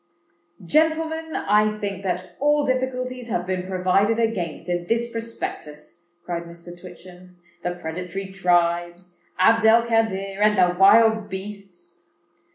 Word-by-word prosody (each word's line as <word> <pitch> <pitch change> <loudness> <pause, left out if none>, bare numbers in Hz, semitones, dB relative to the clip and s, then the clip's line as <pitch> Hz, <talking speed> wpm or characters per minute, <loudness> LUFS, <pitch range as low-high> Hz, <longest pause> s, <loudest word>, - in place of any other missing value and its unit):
"Gentlemen, 320 - 0
I 210 +1 +2
think 200 -2 -4
that 185 -1 -4
all 295 +1 +2
difficulties 255 -1 -2
have 175 -4 -2
been 185 0 -3
provided 190 +4 +1
against 205 -10 -2
in 175 -1 -2
this 230 +3 0
Prospectus," 175 -8 -7 0.2
cried 170 -1 -4
Mr. 170 0 -12
Twitchem:—"the 180 0 -10
predatory 180 +3 -6
tribes, 175 -1 0 0.2
Abd 225 +5 +4
el 230 +1 +6
Kadir, 200 -4 -1
and 210 -1 +4
the 180 -1 +3
wild 220 +2 +5
beasts." 190 -3 -9
190 Hz, 120 wpm, -23 LUFS, 175-225 Hz, 0.2 s, el